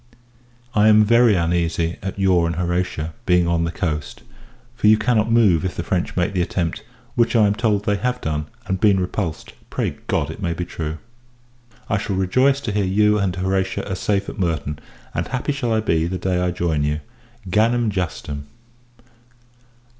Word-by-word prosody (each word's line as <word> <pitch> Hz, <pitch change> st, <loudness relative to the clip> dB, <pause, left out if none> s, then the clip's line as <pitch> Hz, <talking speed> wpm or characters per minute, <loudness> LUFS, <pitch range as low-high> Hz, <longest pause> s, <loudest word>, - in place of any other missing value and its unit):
I 105 Hz, 0 st, +4 dB
am 110 Hz, 0 st, +7 dB
very 115 Hz, 0 st, +5 dB
uneasy 85 Hz, -1 st, 0 dB
at 95 Hz, 0 st, -5 dB
your 90 Hz, -3 st, +3 dB
and 85 Hz, -, -2 dB
Horatia 85 Hz, -2 st, -2 dB
being 90 Hz, -2 st, +4 dB
on 85 Hz, -1 st, +1 dB
the 85 Hz, -, -2 dB
coast: 75 Hz, -5 st, -4 dB, 0.5 s
for 110 Hz, -, +1 dB
you 110 Hz, 0 st, +7 dB
cannot 110 Hz, 0 st, +1 dB
move, 105 Hz, -8 st, +4 dB
if 95 Hz, -, -3 dB
the 85 Hz, -, -3 dB
French 90 Hz, -1 st, -2 dB
make 90 Hz, +3 st, 0 dB
the 90 Hz, -, +1 dB
attempt; 85 Hz, -1 st, -2 dB, 0.3 s
which, 120 Hz, 0 st, +2 dB
I 110 Hz, -2 st, +6 dB
am 100 Hz, -, +3 dB
told, 105 Hz, -2 st, 0 dB
they 100 Hz, 0 st, +1 dB
have 125 Hz, +3 st, -1 dB
done, 75 Hz, -6 st, -3 dB, 0.2 s
and 95 Hz, -1 st, -2 dB
been 100 Hz, -1 st, +4 dB
repulsed. 90 Hz, -2 st, -3 dB, 0.2 s
Pray -, -, -2 dB
God, 70 Hz, -, 0 dB
it 80 Hz, -, -10 dB
may 85 Hz, -3 st, -1 dB
be 90 Hz, +1 st, -4 dB
true! 80 Hz, -2 st, -5 dB, 0.9 s
I 100 Hz, -, 0 dB
shall 100 Hz, -1 st, -2 dB
rejoice 130 Hz, +9 st, +2 dB
to 115 Hz, -, -3 dB
hear 100 Hz, 0 st, +1 dB
you 105 Hz, +3 st, +3 dB
and 95 Hz, -3 st, 0 dB
Horatia 95 Hz, +1 st, -1 dB
are 95 Hz, -, -3 dB
safe 100 Hz, +1 st, -1 dB
at -, -, -7 dB
Merton; 75 Hz, -5 st, -1 dB, 0.3 s
and -, -, -2 dB
happy 130 Hz, +3 st, -2 dB
shall 135 Hz, -4 st, -2 dB
I 110 Hz, -1 st, +2 dB
be, 85 Hz, -5 st, +1 dB
the 90 Hz, +1 st, -3 dB
day 90 Hz, 0 st, -1 dB
I 90 Hz, -, +1 dB
join 85 Hz, -4 st, -1 dB
you. 75 Hz, +1 st, -1 dB, 0.5 s
_Gannam 115 Hz, +4 st, +2 dB
Justem. 75 Hz, -6 st, -4 dB
95 Hz, 185 wpm, -21 LUFS, 85-105 Hz, 0.9 s, am